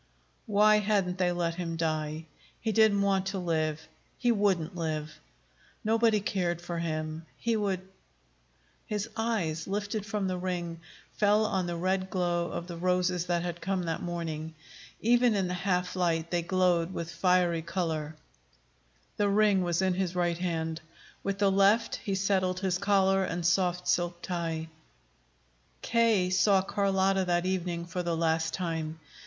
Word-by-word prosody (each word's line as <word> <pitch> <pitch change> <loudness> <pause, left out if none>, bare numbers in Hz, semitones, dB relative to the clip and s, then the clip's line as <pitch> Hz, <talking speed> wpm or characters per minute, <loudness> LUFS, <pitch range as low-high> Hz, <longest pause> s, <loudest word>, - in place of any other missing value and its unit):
Why 210 0 +5
hadn't 195 -3 0
they 180 -1 +2
let 175 -1 -1
him 165 -1 -4
die? 155 -1 -2 0.3
He 220 - -1
didn't 215 -2 +4
want 195 -1 +1
to 195 - -2
live 160 -3 -1 0.3
he 245 -2 +2
wouldn't 195 -5 +1
live. 155 -3 -3 0.6
Nobody 225 0 +3
cared 180 -4 -1
for 175 -1 -5
him! 155 0 -3
He 230 -1 0
would 195 -3 -1 1.0
His 210 0 -2
eyes, 205 -9 -1
lifted 205 +1 -2
from 205 -1 -2
the 185 -1 -2
ring, 175 -2 -3 0.4
fell 210 +1 +4
on 190 -4 0
the 175 - -3
red 185 +2 -1
glow 175 -2 0
of 170 - -4
the 175 -2 -7
roses 180 0 +1
that 175 -1 0
had 175 -1 -4
come 190 +1 -1
that 165 -1 -2
morning. 160 -2 -4 0.5
Even 240 0 +4
in 195 -2 +1
the 180 - -2
half 180 -1 -1
light, 165 -2 0
they 175 -1 +1
glowed 175 -1 +1
with 170 -2 -5
fiery 180 -3 +2
color. 160 -3 -3 1.0
The 205 -1 +2
ring 205 -1 +4
was 175 +1 0
in 185 -1 +2
his 185 -1 -2
right 175 -1 0
hand. 165 -2 -2 0.4
With 200 0 -2
the 200 -1 +3
left 200 +4 +3
he 195 - -3
settled 185 -1 +1
his 185 -2 0
collar 195 -1 +3
and 175 -2 -3
soft 180 0 +1
silk 175 0 0
tie. 165 -3 -3 1.2
K. 225 -6 +2
saw 190 0 +4
Carlotta 195 -1 +1
that 175 0 +1
evening 175 -2 -2
for 180 +1 -3
the 170 -1 -1
last 160 0 +1
time. 160 -3 -3
180 Hz, 155 wpm, -29 LUFS, 170-195 Hz, 1.2 s, Why